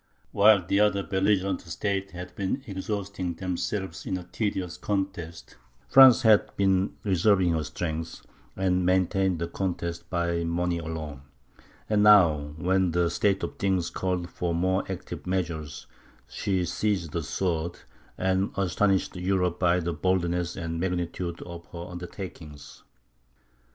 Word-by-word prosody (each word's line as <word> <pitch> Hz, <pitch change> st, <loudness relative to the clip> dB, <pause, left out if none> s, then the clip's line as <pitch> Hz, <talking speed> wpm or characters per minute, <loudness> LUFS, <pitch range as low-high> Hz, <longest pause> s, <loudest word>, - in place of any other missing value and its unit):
While 100 Hz, -3 st, +5 dB
the 100 Hz, +3 st, +1 dB
other 105 Hz, -2 st, +3 dB
belligerent 95 Hz, -1 st, +1 dB
states 95 Hz, +3 st, -3 dB
had 90 Hz, +1 st, -8 dB
been 100 Hz, +8 st, -2 dB
exhausting 100 Hz, -3 st, -4 dB
themselves 90 Hz, 0 st, -3 dB
in 95 Hz, -, -1 dB
a 90 Hz, -, -7 dB
tedious 90 Hz, -1 st, -3 dB
contest, 95 Hz, -5 st, -4 dB, 0.3 s
France 130 Hz, -1 st, +8 dB
had 110 Hz, -2 st, +4 dB
been 95 Hz, -1 st, +2 dB
reserving 95 Hz, -1 st, +3 dB
her 80 Hz, -1 st, 0 dB
strength, 80 Hz, +2 st, -5 dB, 0.3 s
and 90 Hz, -1 st, +1 dB
maintained 95 Hz, 0 st, +2 dB
the 85 Hz, +1 st, -3 dB
contest 85 Hz, -2 st, -4 dB
by 85 Hz, -1 st, 0 dB
money 85 Hz, +1 st, -1 dB
alone; 80 Hz, -4 st, -6 dB, 0.7 s
but 105 Hz, -1 st, +2 dB
now, 85 Hz, -9 st, +5 dB
when 90 Hz, +1 st, +1 dB
the 85 Hz, -1 st, +2 dB
state 100 Hz, -2 st, +1 dB
of -, -, -4 dB
things 95 Hz, -4 st, 0 dB
called 90 Hz, -2 st, -2 dB
for 85 Hz, -1 st, -2 dB
more 95 Hz, +2 st, +1 dB
active 90 Hz, -, -7 dB
measures, 80 Hz, -5 st, -3 dB, 0.4 s
she 90 Hz, +8 st, -1 dB
seized 95 Hz, -5 st, -1 dB
the 85 Hz, -, -2 dB
sword, 85 Hz, +1 st, -2 dB, 0.4 s
and 95 Hz, +1 st, +1 dB
astonished 95 Hz, +1 st, +1 dB
Europe 90 Hz, -1 st, 0 dB
by 90 Hz, 0 st, +3 dB
the 85 Hz, 0 st, -2 dB
boldness 85 Hz, +1 st, 0 dB
and 85 Hz, 0 st, -4 dB
magnitude 90 Hz, -1 st, -3 dB
of 85 Hz, -1 st, -10 dB
her 85 Hz, 0 st, -8 dB
undertakings. 85 Hz, -4 st, -9 dB
90 Hz, 135 wpm, -27 LUFS, 85-95 Hz, 0.7 s, France